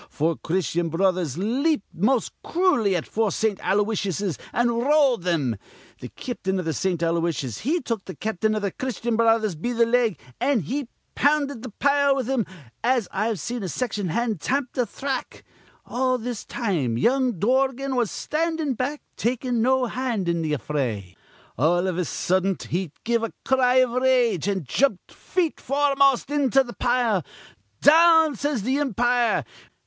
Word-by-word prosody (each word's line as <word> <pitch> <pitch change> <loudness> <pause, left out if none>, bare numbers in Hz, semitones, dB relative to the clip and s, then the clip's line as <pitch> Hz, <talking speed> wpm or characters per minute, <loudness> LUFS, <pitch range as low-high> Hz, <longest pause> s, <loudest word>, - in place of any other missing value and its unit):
Four 160 +2 0
Christyan 175 -1 -1
Brothers 175 -4 0
leaped 255 - 0
most 220 +8 +1
crooly 330 - +2
at 170 - -2
four 220 -1 0
Saint 220 -3 0
Aloysiuses, 200 - -1
an' 240 +1 +2
rolled 255 - +2
thim. 145 - 0 0.4
Th' - - -6
cap'n 195 -6 -3
iv 180 - -3
th' 160 - -1
Saint 175 +2 -1
Aloysiuses 165 -7 -1
he 315 +9 0
took 230 -6 -3
th' 185 - -9
cap'n 215 0 0
iv 210 - -2
th' 200 - -2
Christyan 240 -2 -2
Brothers 225 -3 +3
be 205 +11 -3
th' 235 0 +3
leg, 230 -6 +2 0.2
an' 260 -2 +2
he 265 - -3 0.3
pounded 285 -3 +1
th' 245 -4 -9
pile 280 -1 +3
with 260 -4 -2
him 260 -5 0 0.4
as 240 -4 +2
I've 215 0 -1
seen 240 +9 -4
a 190 - -4
section 210 -2 -2
hand 220 0 -1
tamp 265 - -1
th' 245 -5 -1
thrack. 270 +1 -4 0.4
All 255 0 0
this 240 -1 -5
time 160 - -1
young 255 - +2
Dorgan 265 +5 +1
was 240 -4 +1
standin' 320 -2 -1
back, 265 +5 -3
takin' 245 +1 -1
no 260 +2 +3
hand 240 -6 -2
in 170 -1 0
th' 155 -2 -1
affray. 120 -9 -3 0.4
All 175 +6 +3
iv 185 -2 -1
a 180 - 0
suddent 190 +4 0
he 175 -2 -3
give 235 0 +1
a 230 - -3
cry 255 -1 +3
iv 255 -2 +4
rage, 245 - +2
an' 190 -4 -1
jumped 245 - 0
feet 345 -4 -2
foremost 275 -1 +2
into 270 -2 +3
th' 240 -2 -11
pile. 240 -7 +1 0.6
'Down!' 320 -1 +6
says 280 -3 -2
th' 245 - -2
impire. 240 - +1
235 Hz, 165 wpm, -24 LUFS, 185-260 Hz, 0.6 s, Down